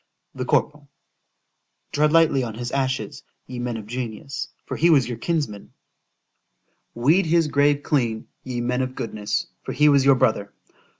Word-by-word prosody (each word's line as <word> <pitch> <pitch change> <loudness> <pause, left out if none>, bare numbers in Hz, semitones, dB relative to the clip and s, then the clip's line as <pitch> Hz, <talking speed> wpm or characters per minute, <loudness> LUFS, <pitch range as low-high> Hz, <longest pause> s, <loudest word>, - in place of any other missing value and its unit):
The - - -4
corporal——— 145 -1 0 1.0
——Tread 150 +1 +2
lightly 160 -4 +4
on 115 -3 -5
his 120 +1 -5
ashes, 135 +1 -2 0.2
ye 125 -1 -7
men 120 -1 -3
of 110 - -8
genius,——for 125 +3 -6
he 170 - +3
was 140 -7 +4
your 120 -2 -5
kinsman: 145 - -3 1.2
Weed 155 +10 +3
his 165 0 +3
grave 145 0 +2
clean, 120 -7 0 0.2
ye 125 -2 -4
men 125 +2 0
of 130 0 -3
goodness,—for 105 -2 -4
he 150 +2 +4
was 140 -2 +5
your 135 0 +6
brother. 110 -6 0
130 Hz, 145 wpm, -23 LUFS, 120-145 Hz, 1.2 s, your